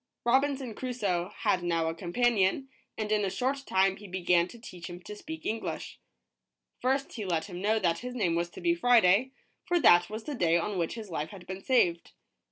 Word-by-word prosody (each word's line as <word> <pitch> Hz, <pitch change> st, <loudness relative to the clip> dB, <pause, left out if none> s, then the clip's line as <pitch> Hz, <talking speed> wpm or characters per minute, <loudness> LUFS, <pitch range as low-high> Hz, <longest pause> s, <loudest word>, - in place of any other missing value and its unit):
Robinson 265 Hz, 0 st, +1 dB
Crusoe 205 Hz, -9 st, -2 dB
had 180 Hz, -, +2 dB
now 165 Hz, -2 st, 0 dB
a 160 Hz, -, -1 dB
companion, 200 Hz, +7 st, +1 dB, 0.3 s
and 215 Hz, -1 st, -3 dB
in 210 Hz, -1 st, +2 dB
a 195 Hz, -, 0 dB
short 260 Hz, +7 st, -1 dB
time 190 Hz, 0 st, +2 dB
he 205 Hz, -, -11 dB
began 180 Hz, -2 st, +2 dB
to 235 Hz, -, -12 dB
teach 180 Hz, -7 st, -9 dB
him 175 Hz, 0 st, -8 dB
to 210 Hz, -, -8 dB
speak 320 Hz, +9 st, -8 dB
English. 225 Hz, +1 st, -4 dB, 0.8 s
First 270 Hz, +2 st, 0 dB
he 220 Hz, -, -5 dB
let 170 Hz, -4 st, -1 dB
him 180 Hz, -3 st, -7 dB
know 215 Hz, +3 st, +2 dB
that 170 Hz, -6 st, +1 dB
his 250 Hz, 0 st, -6 dB
name 180 Hz, -8 st, +1 dB
was 170 Hz, +1 st, -1 dB
to -, -, -7 dB
be 340 Hz, -, +3 dB
Friday, 245 Hz, -, +4 dB, 0.3 s
for 350 Hz, -2 st, +1 dB
that 175 Hz, -, +6 dB
was 220 Hz, +1 st, -6 dB
the 300 Hz, -, -5 dB
day 170 Hz, -9 st, +2 dB
on 185 Hz, +3 st, -2 dB
which 165 Hz, +4 st, -1 dB
his 215 Hz, -5 st, -8 dB
life 155 Hz, -1 st, -3 dB
had 185 Hz, -3 st, -11 dB
been 190 Hz, +1 st, -7 dB
saved. 175 Hz, -10 st, +2 dB
205 Hz, 205 wpm, -29 LUFS, 175-245 Hz, 0.8 s, that